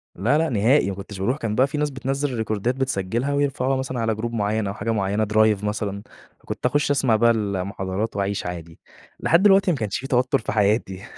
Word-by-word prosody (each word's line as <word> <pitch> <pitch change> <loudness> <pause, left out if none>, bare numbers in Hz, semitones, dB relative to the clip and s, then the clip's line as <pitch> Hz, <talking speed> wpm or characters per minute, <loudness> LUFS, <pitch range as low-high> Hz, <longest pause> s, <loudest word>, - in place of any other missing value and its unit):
لأ، 120 - +2
لأ 165 0 +1
نهائي، 115 +1 +3
ما 95 - -4
كنتش 100 0 -9
باروح. 125 +9 0
كان 110 -5 -3
بقى 130 +4 +4
في 150 - -5
ناس 150 0 0
بتنزل 135 +1 -2
الريكوردات 110 +1 -1
بتسجّلها 130 0 -1
ويرفعوها 135 -2 0
مثلًا 130 -2 -3
على 110 -1 0
group 110 +2 -4
معيّن 105 -1 0
أو 100 - -3
حاجة 105 +2 -3
معيّنة 105 0 0
drive 110 -2 +3
مثلًا، 105 -1 -3 0.4
فكنت - - -6
أخُش 145 +3 +2
أسمع 130 -5 +2
بقى 115 +2 +4
المحاضرات 100 0 -2
وأعيش 100 0 -2
عادي. 85 -2 -7 0.4
لحد 170 +4 +3
دلوقتي 195 -2 +5
ما 155 - -1
كانش 105 -4 -2
في 135 - -6
توتُّر 125 +1 +2
في - - -4
حياتي 100 -2 0
110 Hz, 205 wpm, -23 LUFS, 100-135 Hz, 0.4 s, دلوقتي